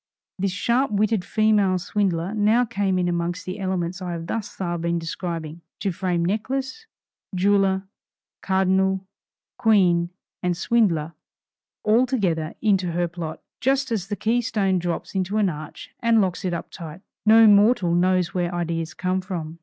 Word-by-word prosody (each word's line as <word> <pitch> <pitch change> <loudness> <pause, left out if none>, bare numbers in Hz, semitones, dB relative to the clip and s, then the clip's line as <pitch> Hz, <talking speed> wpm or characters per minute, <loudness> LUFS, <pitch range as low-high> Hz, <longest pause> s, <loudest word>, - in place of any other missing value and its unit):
This 195 0 0
sharp 235 +8 +1
witted 210 -1 +1
female 210 -3 +2
swindler 180 -1 -1
now 220 +3 +3
came 200 -4 0
in 180 -1 +1
among 170 0 -1
the 185 +3 -5
elements 185 -1 -2
I 180 -1 -3
have 165 -1 -5
thus 215 +4 -3
far 175 -2 -3
been 170 +1 0
describing, 165 -1 -5 0.2
to 195 - -1
frame 175 -1 -1
necklace, 265 - -3 0.5
jeweller, 195 0 +2 0.6
cardinal, 190 0 +1 0.5
queen, 185 -7 +3 0.3
and 180 -2 0
swindler, 170 -8 +1 0.7
all 230 +4 +4
together 175 - -1
into 190 -5 +2
her 175 0 0
plot, 165 -2 -7 0.2
just 270 0 +1
as 200 -4 -1
the 205 - -2
key 230 +4 +1
stone 195 -5 0
drops 175 -1 -4
into 190 +2 -1
an 205 -3 +3
arch 155 -2 -8
and 230 -2 +3
locks 190 -1 0
it 180 - 0
up 170 - -7
tight. 165 +1 -9 0.3
No 225 +1 +8
mortal 205 -3 +5
knows 180 0 +2
where 175 -1 -1
ideas 165 -1 -3
come 185 0 -1
from. 170 -4 -6
185 Hz, 155 wpm, -23 LUFS, 175-210 Hz, 0.7 s, No